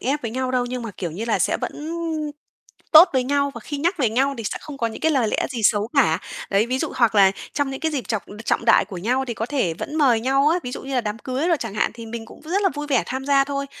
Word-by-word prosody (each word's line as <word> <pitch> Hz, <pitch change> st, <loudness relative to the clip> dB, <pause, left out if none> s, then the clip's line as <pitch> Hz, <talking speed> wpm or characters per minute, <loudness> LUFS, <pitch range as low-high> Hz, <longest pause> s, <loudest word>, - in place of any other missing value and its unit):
ép 280 Hz, +4 st, -1 dB
với 230 Hz, -, -3 dB
nhau 255 Hz, +1 st, -2 dB
đâu, 250 Hz, -1 st, +1 dB
nhưng 250 Hz, 0 st, -4 dB
mà, 230 Hz, -, -5 dB
kiểu 175 Hz, -4 st, -3 dB
như 200 Hz, +8 st, -5 dB
là, 230 Hz, -, +1 dB
sẽ -, -, +1 dB
vẫn -, -, -4 dB, 1.2 s
tốt 320 Hz, +4 st, +10 dB
với 260 Hz, -2 st, +1 dB
nhau 280 Hz, +1 st, +1 dB
và -, -, -7 dB
khi 290 Hz, -, -5 dB
nhắc 345 Hz, +5 st, 0 dB
về 245 Hz, -6 st, +2 dB
nhau 270 Hz, +4 st, +1 dB
thì 230 Hz, -, -5 dB
sẽ -, -, -3 dB
không 300 Hz, -2 st, -9 dB
có 230 Hz, -, +1 dB
những 225 Hz, -, -6 dB
cái 320 Hz, -, +2 dB
lời 250 Hz, -6 st, +2 dB
lẽ -, -, 0 dB
gì 240 Hz, -4 st, -4 dB
xấu 210 Hz, +1 st, +3 dB
cả. 210 Hz, -, +4 dB, 0.3 s
Đấy, 205 Hz, +3 st, +3 dB
ví 255 Hz, +2 st, -1 dB
dụ -, -, -2 dB
hoặc 235 Hz, -3 st, +3 dB
là 195 Hz, -2 st, +6 dB, 0.2 s
trong 285 Hz, -2 st, -1 dB
những 270 Hz, -, -6 dB
cái 320 Hz, -1 st, -1 dB
dịp 255 Hz, -9 st, -3 dB
trọng 220 Hz, -4 st, -1 dB, 0.2 s
trọng -, -, 0 dB
đại 230 Hz, -, +5 dB
của 195 Hz, -1 st, -9 dB
nhau 250 Hz, +8 st, 0 dB
thì 235 Hz, -, -3 dB
có 225 Hz, -, -3 dB
thể 250 Hz, -, 0 dB
vẫn 295 Hz, -, -6 dB
mời 255 Hz, -7 st, +4 dB
nhau 270 Hz, +4 st, +3 dB
á, 335 Hz, +3 st, +2 dB
ví 250 Hz, -, -5 dB
dụ -, -, -6 dB
như 270 Hz, 0 st, -5 dB
là 250 Hz, -, +3 dB
đám 215 Hz, -1 st, -4 dB
cưới 260 Hz, +7 st, -2 dB
đồ 345 Hz, -, +4 dB
chẳng 225 Hz, -5 st, -5 dB
hạn 215 Hz, -, +1 dB
thì 230 Hz, -1 st, -9 dB
mình 225 Hz, 0 st, -6 dB
cũng -, -, -14 dB
rất 365 Hz, +6 st, -1 dB
là 390 Hz, -, +4 dB
vui 295 Hz, 0 st, -4 dB
vẻ 270 Hz, -5 st, +2 dB
tham 265 Hz, +1 st, -4 dB
gia 275 Hz, -1 st, +4 dB
thôi. 280 Hz, 0 st, -3 dB
255 Hz, 305 wpm, -22 LUFS, 225-280 Hz, 1.2 s, tốt